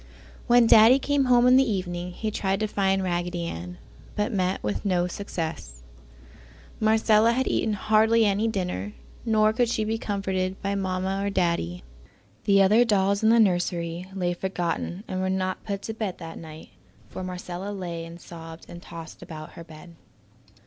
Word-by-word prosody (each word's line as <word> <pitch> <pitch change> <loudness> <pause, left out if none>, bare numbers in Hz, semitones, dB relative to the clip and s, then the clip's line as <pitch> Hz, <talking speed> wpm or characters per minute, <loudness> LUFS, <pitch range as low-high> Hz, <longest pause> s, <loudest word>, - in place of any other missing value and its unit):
When 240 -1 +6
Daddy 225 +3 +7
came 280 0 +1
home 245 -1 +5
in 250 +1 +7
the 265 -3 +3
evening 180 -2 -3
he 215 +4 -4
tried 195 -1 -1
to 215 - +1
find 195 -2 +1
Raggedy, 175 - -3 0.4
but 210 0 -1
met 185 -1 -1
with 105 -1 -2
no 180 -3 +1
success. 160 - -5 1.0
Marcella 220 +1 +4
had 260 +2 0
eaten 220 - 0
hardly 220 +2 +3
any 205 +2 +1
dinner, 180 - -3 0.3
nor 215 -1 +3
could 240 +1 +1
she 220 -2 0
be 220 +1 -2
comforted 190 -2 -2
by 200 0 -1
Mamma 190 0 -2
or 200 - 0
Daddy. 170 - -1 0.6
The 195 -1 +5
other 215 +5 +5
dolls 200 -3 +2
in 220 - +4
the 230 +1 +5
nursery 175 -3 0
lay 175 -2 0
forgotten 175 +1 -3
and 185 0 -3
were 190 - 0
not 185 0 -2
put 200 -1 -4
to 220 - -4
bed 215 -4 -4
that 165 -2 -8
night, 160 -1 -11 0.4
for 185 - -6
Marcella 180 +1 -5
lay 175 -4 -5
and 165 +1 -10
sobbed 165 -1 -11
and 175 - -10
tossed 165 -2 -10
about 155 -1 -9
her 170 - -10
bed. 165 +1 -13
190 Hz, 170 wpm, -25 LUFS, 175-215 Hz, 1.0 s, Daddy